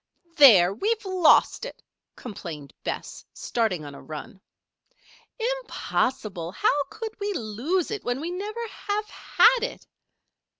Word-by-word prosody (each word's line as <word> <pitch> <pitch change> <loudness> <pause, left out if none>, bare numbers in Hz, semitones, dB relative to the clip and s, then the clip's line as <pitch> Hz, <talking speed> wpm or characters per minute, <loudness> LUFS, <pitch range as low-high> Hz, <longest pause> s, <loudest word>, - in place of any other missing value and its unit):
"There! 200 - +8
we've 425 - -1
lost 370 -3 +4
it," - - -8 0.3
complained 170 - -8
Bess, - - -5
starting 205 -10 -1
on 145 - -8
a - - -11
run. 155 +5 -9 1.2
"Impossible! 205 - -2
How 285 +10 +2
could 440 0 -6
we 410 0 -2
lose 265 - -1
it 425 -2 -4
when 245 +2 -2
we 330 +4 -4
never 425 +5 -4
have 420 0 -3
had 470 +3 +3
it?" - - -4
285 Hz, 125 wpm, -25 LUFS, -, 1.2 s, There